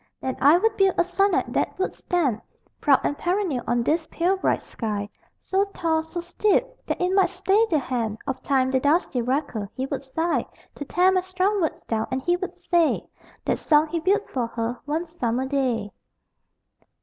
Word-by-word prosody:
Then 260 - -3
I 290 +5 +7
would 435 +3 +1
build 390 -2 +3
a - - +5
sonnet 390 +2 +1
that - - -1
would 380 - -1
stand 285 - -1 0.4
Proud 275 -2 +4
and 290 - 0
perennial 350 - -1
on 240 0 +1
this 315 +5 0
pale 355 +3 +1
bright 380 - 0
sky; 210 -3 -4 0.4
So 390 +1 +1
tall, 320 -2 +1
so 320 +2 -6
steep, 415 +7 +1 0.2
that - - -2
it 360 +1 +1
might 385 -2 +4
stay 390 +4 +2
the 315 - +3
hand 235 -6 -2
Of 265 -2 -3
Time, 260 -2 +1
the 260 - +2
dusty 285 -2 +1
wrecker. 245 -5 -2
He 260 - -2
would 270 0 -4
sigh 320 +6 -1 0.3
To 285 - -7
tear 360 +6 +3
my 370 -1 +2
strong 375 +2 0
words 320 - -2
down. 220 -1 -1
And 260 - -1
he 350 +3 +2
would 370 +1 -5
say: 340 -3 +1 0.4
"That - - 0
song 305 0 +3
he 335 - -1
built 400 +6 +1
for 245 -3 -2
her, 230 +1 -3
one 310 +4 -1
summer 260 -7 -2
day." 255 -7 -1
315 Hz, 190 wpm, -24 LUFS, 260-360 Hz, 0.4 s, I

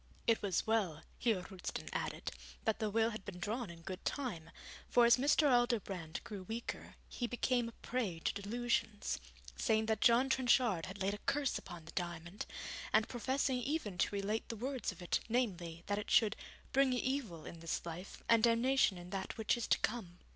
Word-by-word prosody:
It 230 -1 +3
was 195 -4 0
well, 200 -9 +1 0.2
Heer 220 -7 +2
Roosten 185 -1 -6
added, - - -2 0.3
that 220 -2 +1
the 215 -2 0
will 225 +2 +2
had 215 -3 -6
been 190 -2 -7
drawn 215 +4 -2
in 165 -1 -11
good 185 +2 -6
time, 200 - -3 0.4
for 240 -1 +6
as 235 +1 +7
Mr. 290 +3 +4
Aldobrand 215 - +1
grew 205 -3 -6
weaker, 225 +5 -5
he 240 - -3
became 245 -1 +1
a - - -13
prey 230 -9 -1
to - - 0
delusions, 215 - -1 0.4
saying 220 - +2
that 220 -1 0
John 240 +3 +6
Trenchard 245 -8 +3
had 190 +2 -8
laid 195 +1 +1
a 205 - -5
curse 280 -1 +1
upon 170 -2 -10
the 165 - -9
diamond, 175 +1 -4 0.4
and 215 +1 +4
professing 260 +2 0
even 245 - -2
to - - +2
relate 205 +3 -1
the 230 - -3
words 255 +2 -2
of 185 -1 -10
it, 175 - +1
namely, 180 -9 -1
that 205 0 0
it 210 - -6
should 220 -2 +5 0.4
'bring 270 -1 +4
evil 250 - -1
in 170 - -8
this 165 0 -3
life, 170 +3 -7
and 230 -1 +6
damnation 235 -2 +4
in 175 +1 -9
that 195 +2 -4
which 220 -1 +2
is 240 - -3
to - - +5
come.' 200 -7 -2
220 Hz, 190 wpm, -36 LUFS, 185-240 Hz, 0.4 s, as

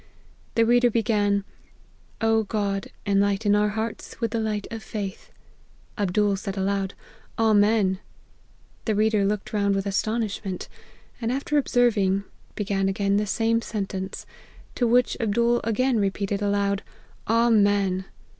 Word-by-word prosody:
The 230 - +4
reader 245 +1 +4
began: 205 -3 +1 0.4
' - - -33 0.3
O 225 0 +3
God, 200 -2 -2 0.2
enlighten 200 +1 +2
our 210 0 +3
hearts 220 +2 -5
with 230 -2 -1
the 230 - -1
light 215 -2 -2
of 225 -1 -5
faith 200 -3 -6 0.3
!' - - -32
Ab 195 -3 0
dool 205 0 +3
said 195 0 -5
aloud, 195 0 -1 0.2
* - - -30
Amen 210 -3 +3 0.4
!' - - -34
The 220 - +1
reader 215 -1 +2
looked 205 +1 -2
round 200 -1 +2
with 195 0 -1
astonishment; 205 -1 -2 0.5
and 230 +1 0
after 280 +3 -2
observing, 220 -8 +2 0.3
be 210 - -2
gan 195 -1 0
again 200 +1 +1
the 210 0 0
same 225 +3 +1
sentence; 195 -3 -4 0.5
to 245 - +1
which 245 +2 +3
Abdool 235 +2 +2
again 235 +2 +1
repeated 200 0 -1
aloud, 200 0 +1 0.3
* - - -29
Amen 205 -5 +3
205 Hz, 145 wpm, -25 LUFS, 200-225 Hz, 0.5 s, The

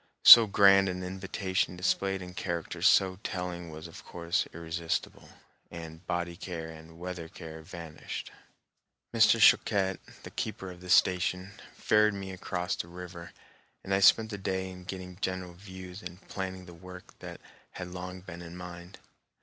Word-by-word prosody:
So 115 -2 +12
grand 100 -1 +6
an 90 0 -4
invitation 95 0 -2
displayed 95 +1 0
in 90 0 -9
characters 85 -3 -1
so 95 -1 +4
telling 90 -2 -4
was 80 +1 -9
of 85 - -12
course 85 +3 -2
irresistible, 85 0 -4 0.4
and 80 0 -9
body 85 0 -2
care 85 -2 -6
and 80 +1 -13
weather 90 -1 -6
care 80 -1 -9
vanished. 80 -1 -8 0.8
Mr. - - +5
Choquette, 95 -2 +4 0.2
the - - -9
keeper 95 -1 -4
of 90 0 -13
the 90 - -10
station, 90 +1 +3 0.2
ferried 105 -1 +3
me 95 -1 -6
across 90 -1 -3
the - - -5
river, 85 -1 -9 0.5
and 95 - -2
I 95 - +3
spent 110 +3 +5
the 100 - -5
day 95 0 -2
in 90 -1 -11
getting 90 -1 -7
general 95 -1 -3
views 95 +1 -10
and 90 -1 -9
planning 95 -1 -5
the 90 - -12
work 90 +2 -12
that - - -9 0.3
had 90 -1 -6
been - - -10
long 90 0 -7
in 85 0 -9
mind. 90 +1 -9
90 Hz, 160 wpm, -30 LUFS, 85-95 Hz, 0.8 s, So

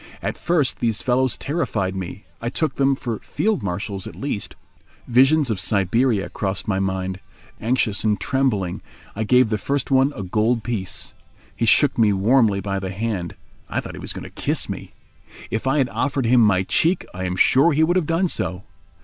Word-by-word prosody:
At - - -2
first 160 -7 0
these 115 -3 0
fellows 130 0 +1
terrified 105 - -2
me. 95 +2 -6 0.2
I 115 - -2
took 150 +2 -1
them 135 0 +3
for 120 -4 -4
field 215 -2 -1
marshals 100 +1 -4
at - - -9
least. 135 -7 -4 0.5
Visions 135 +2 +4
of 100 - -2
Siberia 100 +3 +1
crossed 95 -1 -3
my 95 -2 0
mind. 95 -1 -2 0.4
Anxious 115 -3 0
and 105 -1 +1
trembling, 130 -10 0 0.3
I 110 - -1
gave 125 +1 +4
the 105 - 0
first 140 +5 -2
one 135 +1 +4
a 100 - -5
gold 110 +5 +1
piece. 110 -6 -4 0.4
He 115 - -1
shook 140 +3 +4
me 110 -2 +5
warmly 105 +1 +3
by 95 0 -2
the 95 -1 -4
hand—I 95 -3 -5
thought - - -7
he - - -8
was - - -4
going - - -7
to - - -10
kiss - - -1
me. - - -7 0.6
If 110 +4 -2
I 135 +3 +2
had 135 -3 +2
offered 135 -3 -1
him 120 +1 +5
my 100 -4 +4
cheek 165 - +1
I 95 +1 -4
am 90 0 -2
sure 135 - +5
he 155 +2 +3
would 175 +3 +2
have 180 -5 +1
done 165 +3 +1
so. 90 - -2
115 Hz, 190 wpm, -22 LUFS, 95-135 Hz, 0.6 s, me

